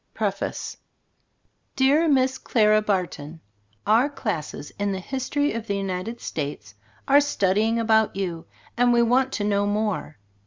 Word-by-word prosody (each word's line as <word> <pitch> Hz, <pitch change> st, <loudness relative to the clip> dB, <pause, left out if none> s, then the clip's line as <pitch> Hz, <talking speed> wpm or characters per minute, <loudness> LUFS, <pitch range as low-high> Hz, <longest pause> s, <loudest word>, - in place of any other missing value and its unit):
PREFACE -, -, -3 dB, 1.0 s
Dear 285 Hz, +5 st, +3 dB
Miss 260 Hz, -2 st, +2 dB
Clara 215 Hz, -2 st, +3 dB
Barton: 175 Hz, -6 st, -3 dB, 0.5 s
Our 230 Hz, +7 st, +4 dB
classes 175 Hz, -, -5 dB
in 200 Hz, -1 st, 0 dB
The 190 Hz, -, -3 dB
History 270 Hz, +7 st, -2 dB
of 230 Hz, 0 st, -5 dB
the 200 Hz, -, -1 dB
United 195 Hz, +4 st, -4 dB
States 140 Hz, -10 st, -5 dB, 0.3 s
are 280 Hz, +1 st, +6 dB
studying 220 Hz, -4 st, +1 dB
about 220 Hz, -2 st, +2 dB
you, 175 Hz, -4 st, -4 dB, 0.3 s
and 245 Hz, 0 st, +3 dB
we 235 Hz, 0 st, +4 dB
want 255 Hz, +3 st, +2 dB
to 205 Hz, -, -2 dB
know 205 Hz, 0 st, +1 dB
more. 205 Hz, -7 st, -2 dB
215 Hz, 140 wpm, -24 LUFS, 190-250 Hz, 1.0 s, are